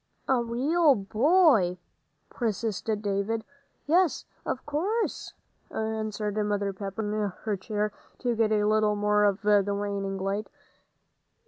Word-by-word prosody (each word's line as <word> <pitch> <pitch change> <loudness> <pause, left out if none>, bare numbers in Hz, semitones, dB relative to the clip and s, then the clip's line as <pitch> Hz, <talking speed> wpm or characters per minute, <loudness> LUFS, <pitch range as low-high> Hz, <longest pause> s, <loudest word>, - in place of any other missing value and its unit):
"A 260 -2 +3
real 280 +6 +3
boy?" 220 - +3 0.5
persisted 220 -2 -2
David. 205 +3 -1 0.4
"Yes, 345 +1 +2 0.2
of 255 - -3
course," 380 +11 -2 0.4
answered 215 -1 -3
Mother 205 -1 -1
Pepper, 195 +2 -5
moving 210 -1 -1
her 215 -2 0
chair 210 +2 -2 0.3
to 245 -2 -1
get 220 -1 +2
a 210 -1 +3
little 215 0 +3
more 210 0 +2
of 200 +1 +1
the 205 -1 +3
waning 200 -1 -2
light. 195 +2 -2
215 Hz, 120 wpm, -27 LUFS, 205-235 Hz, 0.5 s, A